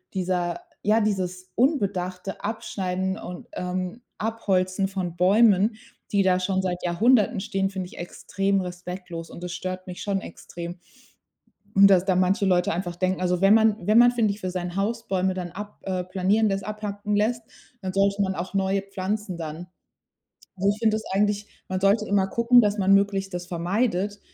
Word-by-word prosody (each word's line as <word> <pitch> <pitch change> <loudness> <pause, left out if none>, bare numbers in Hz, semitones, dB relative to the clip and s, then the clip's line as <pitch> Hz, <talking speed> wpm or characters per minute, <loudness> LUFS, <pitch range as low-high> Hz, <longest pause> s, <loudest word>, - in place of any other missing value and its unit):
dieser 180 - -1 0.2
ja, 215 +2 +3
dieses 185 -3 -2
unbedachte 195 - -1
Abschneiden 190 -4 -2
und 180 - -8
ähm, 185 +5 -4 0.2
Abholzen 195 -3 0
von 185 -3 -4
Bäumen, 205 +3 +4 0.4
die 200 -1 +3
da 185 -1 +3
schon 190 +1 0
seit 180 -1 -3
Jahrhunderten 205 +4 +3
stehen, 195 -1 -1
find 190 -2 -4
ich - - -14
extrem 195 +2 -1
respektlos 180 -1 -7
und 175 - -10
das 180 - -4
stört 185 0 -5
mich 180 - -7
schon 200 -1 -1
extrem. 170 +1 -8 1.0
Und 195 0 +8
dass 185 -2 +5
da 190 -1 +1
manche 195 +3 +2
Leute 180 -3 +2
einfach 175 0 -3
denken, 185 0 0
also 180 -1 +1
wenn 195 +2 +6
man 220 -1 +4
wenn 215 +2 +5
man, 240 0 +7
finde 225 -4 +1
ich, 205 - -12
für 185 - -2
sein 180 -1 -4
Haus 230 +4 -2
Bäume 190 0 +1
dann 180 -2 -5
ab 205 +3 -8
äh, 185 -1 -2
planieren 195 +4 +1
lässt, 195 0 -2
abhacken 210 -1 -3
lässt, 230 +3 +1 0.4
dann 185 -1 -4
sollte 200 +1 +2
man 190 -1 0
auch 175 +3 -5
neue 195 0 +1
pflanzen 195 -1 -4
dann. 160 +2 -6 0.9
Und 195 +2 +1
ich 215 - -11
finde 220 -2 +3
das 220 - -3
eigentlich 205 +1 +1 0.2
man 185 0 -3
sollte 205 +2 +3
immer 200 -1 +2
gucken, 235 +3 +5
dass 210 -1 +1
man 195 +1 +4
möglichst 195 -1 +2
das 175 0 -4
vermeidet 195 +3 -1
195 Hz, 180 wpm, -25 LUFS, 180-205 Hz, 1.0 s, Und